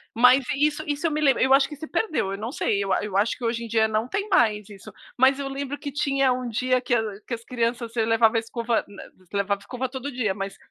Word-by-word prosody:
mas 250 +3 +6
isso 295 +2 +1
isso 295 +3 -2
eu 325 - +2
me 305 +1 -1
lembro, 275 -3 +3
eu 265 +1 +4
acho 275 0 +4
que 300 - -7
se 295 - -8
perdeu, 340 - -1
eu 195 - -4
não 225 +3 -4
sei, 200 -7 0
eu 195 - -3
a 190 - +1
eu 200 - -6
acho 205 +3 +2
que 245 - -5
hoje 230 0 -1
em - - -6
dia 220 -1 +2
não 220 +2 -1
tem 400 +8 -2
mais 215 - +2
isso. 205 +1 -12 0.2
Mas 265 +2 +4
eu 275 - -3
lembro 275 +1 -4
que 285 0 -6
tinha 275 -2 +1
um 250 -1 -4
dia 255 +3 +1
que 250 - -2
a 225 - +1 0.2
que - - -4
as 230 - -13
crianças 235 -1 -2
levava 225 0 +3
a - - +4
escova, 230 0 -1
na 200 -1 -11 0.3
levava 200 0 0
escova 255 +4 -4
todo 265 +2 -6
dia, 235 -6 -1
mas, 195 0 -6
245 Hz, 265 wpm, -24 LUFS, 220-275 Hz, 0.3 s, mas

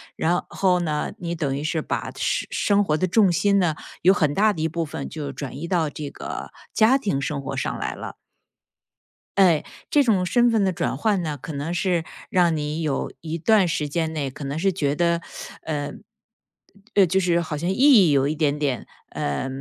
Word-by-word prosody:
然 175 +2 0
后 185 -2 +2
呢， 155 -3 -2
你 170 -1 -3
等 140 -4 -1
于 145 - -4
是 160 0 -1
把 - - -3
生 - - -1
生 205 0 +2
活 150 - +1
的 170 +4 +1
重 195 0 +4
心 200 +3 +3
呢， 170 -4 +1 0.3
有 185 +3 +6
很 150 -7 +1
大 210 +3 +3
的 155 - -5
一 160 - +2
部 165 +1 -2
分 140 -2 -6
就 145 -3 -5
转 135 -2 -6
移 170 +4 -5
到 165 -4 +1
这 145 0 -6
个 - - -7 0.2
家 230 +4 +5
庭 200 - -1
生 140 +1 -2
活 135 - -5
上 - - -2
来 - - -3
了。 - - -7 1.2
哎， 175 -6 +5 0.3
这 290 -1 +5
种 200 -7 +2
身 240 +5 +3
份 225 -3 +2
的 190 -2 +1
转 135 - -2
换 205 +1 +1
呢， 155 -3 -3
可 155 - -7
能 145 +4 -3
是 175 -2 0 0.3
让 175 -3 +3
你 150 +2 -3
有 150 -4 -1
一 165 +1 -4
段 195 +2 +4
时 150 -2 -1
间 160 +2 -1
内 140 -4 -3
可 140 - -9
能 140 +2 -3
是 190 +3 +1
觉 145 -5 0
得， 170 +1 +1 0.4
呃， 145 -2 -3 1.0
呃 200 -2 +7
就 190 +3 +1
是 175 -2 +2
好 160 -3 -3
像 170 +4 -2
意 190 - 0
义 255 - +7
有 140 -1 +3
一 150 - 0
点 150 -2 0
点， 140 -5 -2 0.2
呃， 75 - -2
165 Hz, 225 characters per minute, -23 LUFS, 150-190 Hz, 1.2 s, 呃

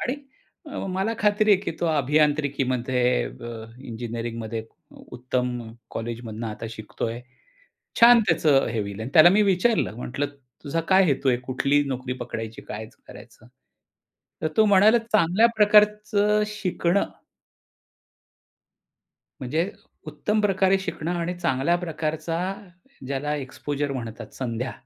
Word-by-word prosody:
आणि 250 - -1 0.6
अ, - - -6
मला 190 +4 -1
खात्री 210 +1 +3
आहे 195 - +3
की 170 - -2
तो 170 - +1
अभियांत्रिकीमध्ये 135 - +1
अ, 110 - -8 0.2
इंजिनिअरिंगमध्ये 115 -2 -5 0.3
उ - - -15
उत्तम 125 -1 -2 0.3
कॉलेजमधनं 115 -1 -5
आता 110 +1 -6
शिकतोय. 115 +1 -5 0.8
छान 235 0 +9
त्याचं 150 -4 +3
हे 115 -1 -2
होईल. 100 0 -5
अन 115 - -4
त्याला 160 0 +9
मी 210 +2 +4
विचारलं 195 - +1
म्हटलं, 130 +4 -3 0.4
"तुझा 160 +3 -1
काय 190 0 +6
हेतू 140 -3 +1
आहे? 125 - +4
कुठली 140 +2 +2
नोकरी 130 -1 -3
पकडायची? 115 -2 -6
काय 110 +1 -7 0.2
करायचं?" - - -14 1.0
तर 155 - +1
तो 220 - +6
म्हणाला, 210 +3 +6
"चांगल्या 215 -2 +3
प्रकारचं 210 0 +4
शिकणं." 200 -3 0 2.4
म्हणजे 155 +9 -1 0.4
उत्तम 210 +8 -1
प्रकारे 195 -1 +3
शिकणं 175 -2 -4
आणि 170 +1 -2
चांगल्या 135 +2 +1
प्रकारचा 160 0 -3 0.7
ज्याला 140 +2 -2
एक्स्पोजर 145 +1 -4
म्हणतात 115 -4 -7
संध्या. 125 0 -3
145 Hz, 120 wpm, -24 LUFS, 120-190 Hz, 2.4 s, छान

